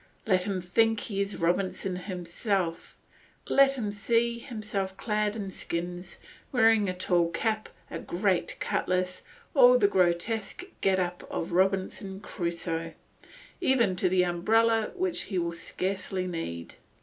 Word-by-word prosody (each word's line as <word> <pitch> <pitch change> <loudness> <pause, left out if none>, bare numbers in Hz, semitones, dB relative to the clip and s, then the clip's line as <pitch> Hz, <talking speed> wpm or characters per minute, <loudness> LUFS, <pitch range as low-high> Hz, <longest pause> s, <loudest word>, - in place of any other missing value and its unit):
Let 185 -3 +2
him 190 -3 -2
think 225 +4 +2
he 200 -2 -2
is 200 0 -2
Robinson 185 +2 0
himself; 180 -1 -3 0.5
let 275 0 +5
him 225 -6 -3
see 235 +3 +1
himself 210 -6 -4
clad 210 -1 0
in 200 -3 -4
skins, 175 +1 -4 0.3
wearing 225 -5 +4
a - - -1
tall 175 -2 +2
cap, 215 +4 -1 0.2
a - - -4
great 180 -1 0
cutlass, 185 0 0 0.3
all 250 -4 +8
the 210 -4 +4
grotesque 190 - 0 0.2
get 190 -1 +3
up 180 -1 -3
of 170 +2 -3
Robinson 190 +1 0
Crusoe, 170 -4 -3 0.7
even 235 - +3
to 185 0 +2
the 180 0 +3
umbrella 220 +6 +2
which 370 -2 -1
he 190 - -3
will 170 -1 0
scarcely 185 +2 -2
need. 125 - -5
190 Hz, 135 wpm, -28 LUFS, 180-220 Hz, 0.7 s, all